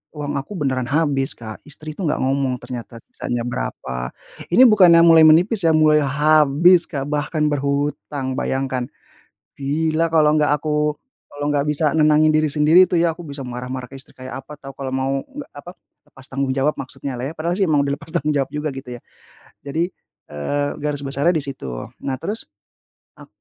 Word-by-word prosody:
uang 145 -1 -4
aku 140 +9 -8
beneran 130 -5 -1
habis, 145 -3 +1
Kak, 110 -2 -9
istri 155 +1 -7
itu 190 - -3
enggak 150 - -1
ngomong 135 -1 0
ternyata 120 -1 -8
sisanya 120 -1 -4
berapa, 65 - -4 0.4
ini 180 - +4
bukannya 180 -6 +6
mulai 165 -1 +7
menipis 180 +5 +4
ya, 160 - +4
mulai 155 -1 +5
habis, 155 +4 +4
Kak, 140 -2 -4
bahkan 150 +1 0
berhutang. 140 -1 -2
Bayangkan, 130 -2 -2 0.7
bila 155 +4 0
kalau 155 -2 +4
enggak 150 -1 +2
aku 150 0 -1 0.3
kalo 145 - -7
nggak 140 -1 +1
bisa 150 0 +1
nenangin 155 0 +4
diri 155 0 +2
sendiri 155 +5 +6
itu 175 - +1
ya, 165 -1 +2
aku 175 - -10
bisa 140 -1 -7
marah-marah 125 +1 -5
ke 135 - -12
istri 135 - -11
kayak 130 +1 -7
apa 150 - -11
tahu, 135 -1 -10
kalau 135 -1 -5
mau 130 0 -1 0.2
nggak 285 0 -9
apa, 145 +5 -9 0.4
lepas 130 - -13
tanggung 135 0 -1
jawab 140 +3 +1
maksudnyalah 135 0 -5
ya. - - -11
Padahal 170 +2 -1
sih 200 - +2
emang 150 -2 +3
udah 140 - 0
lepas 165 - -12
tanggung 150 -3 0
jawab 135 -2 0
juga 150 +1 -3
gitu 135 -2 -8
ya, - - -19 0.6
jadi, 165 +6 -1 0.4
eee, 145 - -2
garis 145 -1 -3
besarnya 140 +5 +1
di 155 - 0
situ. 135 - -6 0.3
Nah 135 - -2
terus, 210 +9 -4 0.7
ak - - -13
145 Hz, 180 wpm, -20 LUFS, 135-155 Hz, 0.7 s, mulai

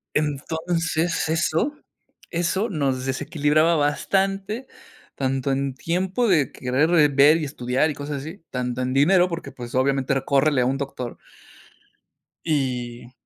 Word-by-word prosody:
Entonces, 160 +3 -1
eso 165 - +1 0.6
eso, 185 +6 0
nos 135 -7 -1
desequilibraba 150 +4 +2
bastante. 195 - 0 0.5
Tanto 135 0 -1
en 135 -1 -1
tiempo, 185 - -1
de 160 -9 +3
querer, 130 +5 0
eh, 150 -2 +6
ver 145 +3 +6
y 155 - -2
estudiar, 130 +1 0
y - - -4
cosas 145 +1 -5
así. 160 +5 -9
Tanto 125 0 -3
en 125 0 -1
dinero, 175 +7 +4
porque, 170 -1 -5
pues, 120 -1 -8
obviamente, 135 +1 +1
era: 135 -1 -1
"Córrele 140 -1 +3
a - - +2
un 135 +2 0
doctor". 135 -3 -5 1.3
Y 125 -5 -2
145 Hz, 135 wpm, -23 LUFS, 135-165 Hz, 1.3 s, eh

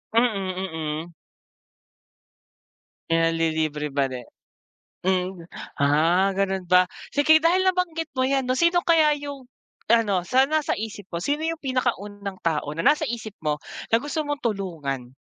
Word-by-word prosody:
Mm, 195 -5 +1 0.4
mm. 170 - -16 2.0
Pinanlilibre 160 -2 +1
ba 135 -1 0
din. 125 -1 -7 0.8
Hmm 185 -1 -1 0.3
ah, 165 +7 +3
ganun 190 -1 -1
ba? 180 +1 +4 0.2
Sige 295 +2 +5
dahil 350 +3 +4
nabanggit 345 -3 -1
mo 255 - +2
yan 265 -1 0
no 255 - +1
sino 340 +3 +3
kaya 320 -3 +4
yung 285 -2 -7 0.4
ano, 210 -6 +2
sa 260 +7 +3
nasa 310 -1 +1
isip 215 -2 -6
mo, 170 - -2
sino 290 - -1
yung 330 0 -2
pinakaunang 205 -7 -3
tao 150 -3 -1
na 160 - -4
nasa 295 - +3
isip 225 -5 -5
mo, 150 0 0 0.3
na 225 - +5
gusto 295 +3 -3
mong 290 -1 -3
tulungan? 160 - -3
205 Hz, 140 wpm, -24 LUFS, 170-285 Hz, 2.0 s, Sige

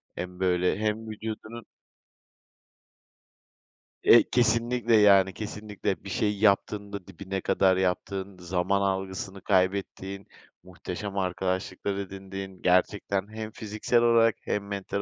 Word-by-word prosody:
hem, 90 0 -6
böyle, 90 0 +2
hem 110 +1 -2
vücudunun 110 +1 -7 2.4
Eee, - - +8
kesinlikle 120 0 +2
yani 100 -2 +6
kesinlikle 105 -3 -4
bir 100 - -8
şey 105 +1 0
yaptığında 100 -1 +1
dibine 95 +1 -5
kadar 95 -1 +3
yaptığın, 95 +1 -2
zaman 90 +2 0
algısını 95 0 -3
kaybettiğin, 95 0 -1 0.4
muhteşem 95 +2 -6
arkadaşlıklar 95 +1 -2
edindiğin, 95 -1 -7
gerçekten 95 +2 +1
hem 110 0 -5
fiziksel 110 +3 0
olarak 115 -2 +4
hem 100 -1 -3
mental 100 0 -3
100 Hz, 105 wpm, -27 LUFS, 95-105 Hz, 2.4 s, Eee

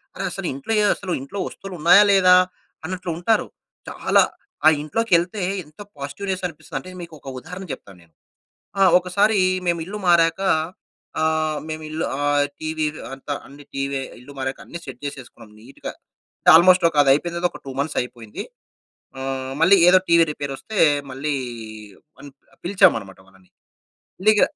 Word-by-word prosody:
అరె! - - -4
అసలు - - -4
ఇంట్లో 140 +11 -6
ఏ - - +3
అసలు 185 -3 -6
ఇంట్లో 170 +9 -7
వస్తువులున్నాయా? 180 +1 +4
లేదా? 185 -2 +6 0.5
అన్నట్లు 180 0 -4
ఉంటారు. 220 +6 +1 0.4
చాలా - - +3 0.4
ఆ - - +11
ఇంట్లో‌కేళ్తే 180 +2 0 0.2
ఎంత 150 +4 -23 0.2
పాజిటివ్‌నెస్ 185 +7 -4
అనిపిస్తదంటే, 170 +3 -8
మీకు 170 -1 -10
ఒక 135 - -9
ఉదాహరణ 180 +7 -9
చెప్తాను 95 -2 -12
నేను. 80 -1 -28 0.7
ఆ! - - +3 0.2
ఒకసారి 200 +4 +2 0.3
మేము 170 -1 +1
ఇల్లు 210 +2 -5
మారాక 165 +1 +4 0.8
ఆహ్, 155 -1 0
మేమిల్లు 155 0 -4 0.2
ఆహ్, 145 0 +2 0.2
టీవీ 155 0 -3 0.3
అంతా 135 +2 -5
అన్ని 145 +1 -14
టీవీ 135 0 -2 0.2
ఇల్లు 140 +3 -13
మారాక 135 0 -3
అన్ని 170 - -8
సెట్ 130 -2 -9
చేసేసుకున్నాం 130 -5 -9
నీట్‌గా. 130 +5 -9 0.5
అంటే - - +3
ఆల్మోస్ట్ 180 +1 +6
ఒక 150 - -7
అది 140 - +3
అయిపోయిన 170 +4 -2
తర్వాత 175 0 +1
ఒక - - -11
2 135 - -6
మంత్స్ 145 +2 -2
అయిపోయింది. 120 -3 -8 0.8
ఆహ్, 130 0 -4
మళ్ళీ 185 +4 +7
ఏదో 185 +1 +7
టీవీ 170 0 +6
రిపేర్ 145 -2 -5
వస్తే 220 - -8 0.3
మళ్ళీ 145 +3 -2 0.9
వన్ 145 - -11 0.4
పిలిచామన్నమాట 110 - +2
వాళ్ళని. 95 -1 -23 0.7
ఇల్లీగ 215 0 +4
160 Hz, 145 wpm, -22 LUFS, 140-180 Hz, 0.9 s, ఆ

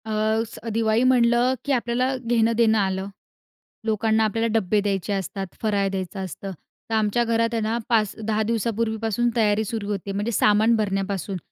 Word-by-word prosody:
अ, 220 - -5 0.4
स - - -10
दिवाळी 225 +1 +2
म्हटलं 245 0 +4
की 285 - -1
आपल्याला 250 +1 0
घेणं-देणं 230 -2 +2
आलं. 190 -1 -1 0.8
लोकांना 220 0 +2
आपल्याला 225 +2 0
डब्बे 210 +1 +1
द्यायचे 200 0 -1
असतात, 195 0 -3
फराळ 205 -3 +1
द्यायचं 190 0 -4
असतं. 195 +3 -7 0.4
तर 225 - 0
आमच्या 220 +2 +2
घरात 230 0 +1
आहे 230 - 0
ना 220 +2 0
5-10 220 -1 +1
दिवसापूर्वीपासून 225 0 0
तयारी 215 -2 +2
सुरू 215 -1 -4
होते, 200 -1 -3
म्हणजे 205 +4 -2
सामान 215 +1 +4
भरण्यापासून. 195 -2 -2
220 Hz, 150 wpm, -23 LUFS, 200-230 Hz, 0.8 s, म्हटलं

